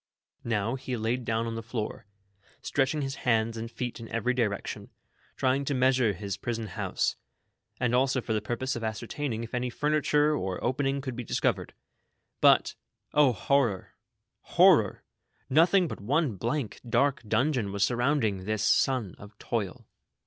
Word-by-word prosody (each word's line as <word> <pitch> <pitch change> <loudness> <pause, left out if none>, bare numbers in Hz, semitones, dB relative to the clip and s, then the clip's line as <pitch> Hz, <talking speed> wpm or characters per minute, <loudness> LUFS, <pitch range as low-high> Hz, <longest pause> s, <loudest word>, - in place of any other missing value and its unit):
Now 110 0 0
he 130 -1 -4
laid 115 +3 -1
down 115 0 0
on 115 - -3
the 115 - -4
floor, 110 -2 -5 0.5
stretching 140 +2 0
his 135 0 -4
hands 115 -1 +1
and 115 0 -5
feet 120 0 -5
in 115 - -9
every 115 +2 0
direction, 115 -5 -2 0.5
trying 130 +2 +1
to 140 - -1
measure 130 -4 +3
his 100 +1 -5
prison 115 -2 -4
house, - - -1 0.6
and 125 -2 +1
also 130 +1 +3
for 115 -2 -3
the 105 - 0
purpose 130 +3 -2
of 120 - -5
ascertaining 115 +2 -3
if 115 - -9
any 125 0 -1
furniture 150 +2 +2
or 95 -7 -3
opening 135 +2 0
could 130 -3 -5
be 125 - -4
discovered; - - -1 0.6
but, - - +5 0.4
O, 145 -3 +5
horror! 120 -2 0 0.5
horror! - - +4 0.5
nothing 175 +5 +5
but - - -7
one 140 +2 +1
blank, 120 +4 -3
dark 140 +4 +2
dungeon 115 -1 +1
was 100 0 0
surrounding 120 -4 +1
this 105 0 -1
son 125 -3 +2
of 105 +1 -13
toil. 105 -6 -3
120 Hz, 155 wpm, -28 LUFS, 110-135 Hz, 0.6 s, but